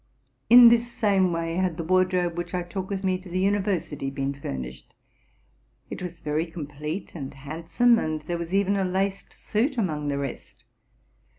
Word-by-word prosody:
In 240 0 +10
this 235 0 +2
same 195 -5 +2
way 165 0 -2
had 185 -3 0
the 165 - -3
wardrobe 180 0 +2
which 175 +1 -4
I 180 - -1
took 185 +2 -5
with 195 -1 -3
me 185 -1 +1
to 185 0 -12
the 180 - -3
university 190 -7 0
been 135 0 -2
furnished: 65 - -7 1.0
it - - -6
was 175 -2 -7
very 155 +2 -1
complete 150 +2 -6
and 140 -5 -6
handsome, 165 - +1
and 155 -4 -2
there 170 +2 -3
was 170 0 -5
even 200 0 +2
a 195 - +1
laced 190 +1 -1
suit 250 +6 -1
amongst 155 -9 -1
the 140 - -1
rest. 140 -3 -6
175 Hz, 175 wpm, -25 LUFS, 155-195 Hz, 1.0 s, In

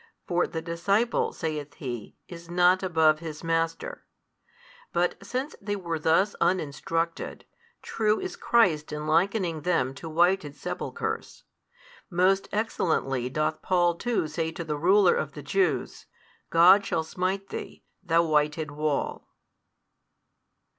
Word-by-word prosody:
For 175 0 +1
the 160 -1 -5
disciple, 200 +8 +1
saith 150 -3 -4
He, 120 -6 -6
is 170 -1 -11
not 180 +1 +4
above 160 -4 +3
his 155 -1 -7
master. 165 0 -2 0.9
But 180 +3 0
since 255 +8 -4
they 205 0 -2
were 170 -4 -3
thus 165 +7 +2
uninstructed, 165 0 -1 0.4
true 215 -1 +1
is 375 -1 -5
Christ 180 - +2
in 150 0 -4
likening 170 0 +1
them 145 -6 +1
to 160 +4 -8
whited 170 -2 +2
sepulchres. 145 - -5 0.7
Most 185 +2 +2
excellently 160 - 0
doth 155 +3 -1
Paul 175 -2 +2
too 225 -1 -1
say 160 +1 -2
to 170 - -5
the 155 -2 -3
ruler 185 +5 +4
of 150 -2 -2
the 145 - -9
Jews, 160 -5 -1 0.4
God 180 +5 +7
shall 170 -4 -1
smite 185 +4 -2
thee, - - -7 0.2
thou 170 -2 +3
whited 150 0 +1
wall. 150 0 -2
170 Hz, 125 wpm, -27 LUFS, 155-190 Hz, 0.9 s, God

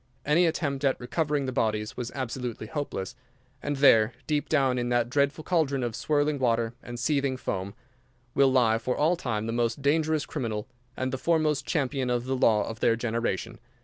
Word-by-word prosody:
Any 165 +4 +4
attempt 145 -4 -2
at 135 -2 +2
recovering 145 +2 -1
the 130 - -2
bodies 110 -3 -1
was 125 -1 -4
absolutely 125 -3 -4
hopeless, 110 -7 -4 0.5
and 145 0 -2
there, 125 -5 +5
deep 150 -1 -1
down 135 -4 +2
in 120 0 -1
that 120 0 +1
dreadful 140 +3 +1
caldron 145 -7 +1
of 120 -2 -2
swirling 145 -1 0
water 115 -2 +1
and 120 -1 -7
seething 140 0 0
foam, 100 -4 -4 0.6
will 135 -1 +4
lie 115 -4 +3
for 125 +2 -2
all 160 +4 +3
time 115 -10 -3
the 115 - -2
most 120 +3 -1
dangerous 155 +1 +2
criminal 110 -4 -4 0.3
and 130 0 -2
the 130 - -2
foremost 155 -2 +1
champion 135 -5 0
of 120 0 0
the 130 +1 -1
law 110 -4 +3
of 110 0 -6
their 115 0 +3
generation. 115 -4 -2
130 Hz, 180 wpm, -27 LUFS, 115-145 Hz, 0.6 s, there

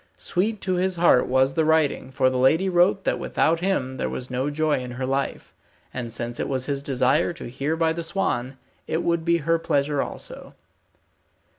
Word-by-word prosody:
Sweet 205 +4 -1
to 185 -1 0
his 185 +1 +1
heart 170 -7 +4
was 130 +1 +2
the 160 - +1
writing, 155 -4 +1
for 130 -1 +2
the 130 - -1
lady 160 +9 +3
wrote 185 +2 +3
that - - 0
without 165 +1 +1
him 135 -9 -1
there - - -2
was 125 0 -6
no 130 +3 -1
joy 155 -1 0
in 125 -1 -6
her 130 +1 -3
life, 135 +1 -3 0.4
and 120 -2 -5
since 120 +1 -3
it - - -2
was 130 -2 0
his 140 -1 -2
desire 135 +4 +1
to 170 - -9
hear 140 +6 -2
by 165 0 +1
the 170 - -4
swan, 135 -7 -2 0.3
it 165 - -1
would 170 -1 0
be 170 0 +3
her 165 0 +2
pleasure 145 -2 0
also. - - -7
145 Hz, 195 wpm, -24 LUFS, 130-170 Hz, 0.4 s, heart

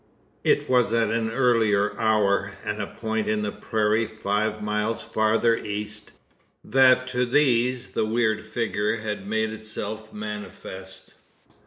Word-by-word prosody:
It - - +2
was 125 -3 +3
at 115 -2 +2
an 115 -1 0
earlier 115 -5 +2
hour, 100 -3 +2
and 105 0 -2
a - - -3
point 110 -1 -3
in 105 -1 0
the 105 - -1
prairie 110 +1 0
five 110 0 -1
miles 105 +1 -1
farther 110 +2 +2
east, 105 0 -5 0.5
that 130 -1 +5
to 125 0 0
these 125 -3 +2
the - - 0
weird 110 -1 +1
figure 110 -1 -1
had 105 -2 -4
made 110 +1 0
itself 110 0 -6
manifest. 105 -3 -8
110 Hz, 135 wpm, -25 LUFS, 105-115 Hz, 0.5 s, that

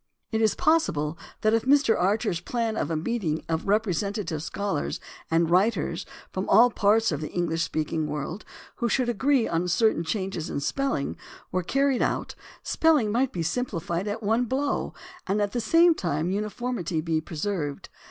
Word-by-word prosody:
It 220 0 0
is 220 -2 +3
possible 170 - +1 0.3
that 215 0 +3
if 225 - +3
Mr. 275 -4 +4
Archer's 200 -1 +1
plan 230 +2 -2
of - - -1
a 165 - -1
meeting 165 -2 -2
of 160 +2 -2
representative 200 -4 0
scholars 190 - -2 0.3
and 165 +1 +3
writers 180 -1 +1 0.2
from 190 +1 -3
all 235 +4 +7
parts 220 0 +3
of 150 -1 -2
the 155 - -4
English 165 -2 -1
speaking 155 -1 -1
world, 150 +6 -4 0.3
who 235 - 0
should 250 +1 +1
agree 265 +2 +2
on 170 +2 0
certain 200 0 +2
changes 185 -2 -3
in - - -2
spelling, 270 - -1 0.3
were 185 - 0
carried 275 +7 +1
out - - -1 0.3
spelling 300 -10 +3
might 245 +4 +1
be 175 - -3
simpli 245 +2 -1
fied 175 +4 -2
at 215 +2 -3
one 225 +4 +2
blow 275 +4 -1 0.3
and 195 +2 +1
at 205 -1 0
the 240 - -1
same 330 +9 +5
time 170 - -1
uniformity 210 -4 -2
be 160 0 0
preserved. 155 -2 -4
200 Hz, 170 wpm, -26 LUFS, 165-235 Hz, 0.3 s, all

